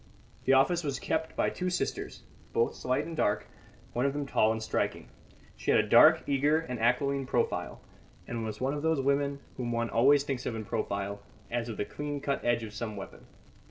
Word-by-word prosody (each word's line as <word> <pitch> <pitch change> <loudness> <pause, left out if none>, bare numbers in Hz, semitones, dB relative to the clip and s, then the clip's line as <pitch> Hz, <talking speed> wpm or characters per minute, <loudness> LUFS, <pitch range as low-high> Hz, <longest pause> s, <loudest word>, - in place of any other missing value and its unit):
The - - +5
office 170 +6 +4
was 140 -4 -2
kept 160 +4 -2
by - - +1
two 180 0 -2
sisters, 180 - -3 0.3
both 115 - +2
slight 130 0 -1
and 165 - -6
dark, 105 -9 +1 0.5
one 125 +3 +1
of 140 - -1
them 145 0 -2
tall 110 -5 +3
and 110 - -2
striking. 110 - -2 0.5
She - - -5
had - - +5
a - - +1
dark, - - +7
eager 145 +2 +3
and 125 -7 -5
aquiline 135 +3 +1
profile, - - -1 0.4
and 115 -1 -4
was 110 -1 -5
one 135 +2 0
of 145 - -3
those 160 -1 +1
women 140 +1 +1 0.2
whom 120 -2 -2
one 115 0 -1
always 135 +5 +5
thinks 135 -3 -3
of 115 - -2
in 110 -1 -5
profile, 100 -2 -3 0.3
as 120 0 -2
of 110 - -5
the - - -1
clean 145 +3 -4
cut 140 0 -2
edge 120 -1 +1
of 105 -2 -7
some 110 -1 -4
weapon. 95 - -9
130 Hz, 205 wpm, -30 LUFS, 115-145 Hz, 0.5 s, dark